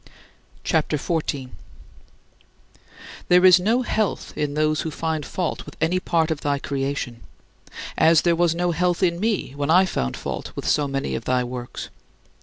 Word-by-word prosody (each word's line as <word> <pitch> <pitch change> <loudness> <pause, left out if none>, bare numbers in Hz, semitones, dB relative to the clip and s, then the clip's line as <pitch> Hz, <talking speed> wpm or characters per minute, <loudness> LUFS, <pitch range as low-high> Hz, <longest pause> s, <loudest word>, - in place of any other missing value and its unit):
CHAPTER 155 -1 +1
XIV - - -9 0.2
20. 135 -3 -3 1.8
There 180 +1 +5
is 185 -1 +8
no 225 +7 +1
health 215 -4 -1
in 145 -1 -2
those 155 0 +1
who 160 - -3
find 160 0 -2
fault 175 +3 -3
with - - -12
any 165 +3 +1
part 165 -3 +1
of 155 - -2
thy 145 -1 0
creation; 135 -4 -3 0.8
as 160 -1 +5
there 170 -1 +3
was 170 -1 +2
no 175 0 0
health 175 +2 0
in 170 -1 +2
me 210 - -1
when 145 +1 -2
I 180 +4 +6
found 65 - -2
fault - - -5
with - - -5
so 145 -1 +2
many 135 - -2
of 65 - -4
thy 125 0 +1
works. 125 0 -6
160 Hz, 170 wpm, -23 LUFS, 140-175 Hz, 1.8 s, is